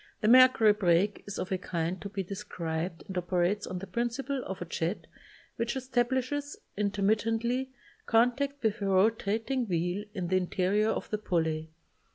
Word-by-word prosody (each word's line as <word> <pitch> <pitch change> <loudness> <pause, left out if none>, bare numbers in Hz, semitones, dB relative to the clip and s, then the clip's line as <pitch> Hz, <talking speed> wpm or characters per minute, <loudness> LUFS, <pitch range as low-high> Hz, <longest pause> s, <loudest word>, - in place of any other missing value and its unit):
The 215 - +1
mercury 250 -3 +7
break 195 0 +2
is 205 - -5
of 185 - -4
a 190 - 0
kind 175 0 -3
to 200 - -5
be 195 -1 -3
described 170 -3 -4
and 190 - -8
operates 180 +3 0
on 185 - -4
the 185 - -6
principle 240 +6 -2
of 190 - -5
a 175 - -4
jet 170 +3 -3 0.5
which 235 +2 -1
establishes, 260 +2 -1 0.2
intermittently, 220 +5 0 0.4
contact 260 +5 +2
with 220 0 0
a 200 - 0
rotating 225 +5 +1
wheel 180 +3 -1
in 180 -3 -3
the 185 - +3
interior 190 +4 +1
of - - -3
the 215 - -1
pulley. 160 -5 -1
205 Hz, 160 wpm, -29 LUFS, 180-235 Hz, 0.5 s, mercury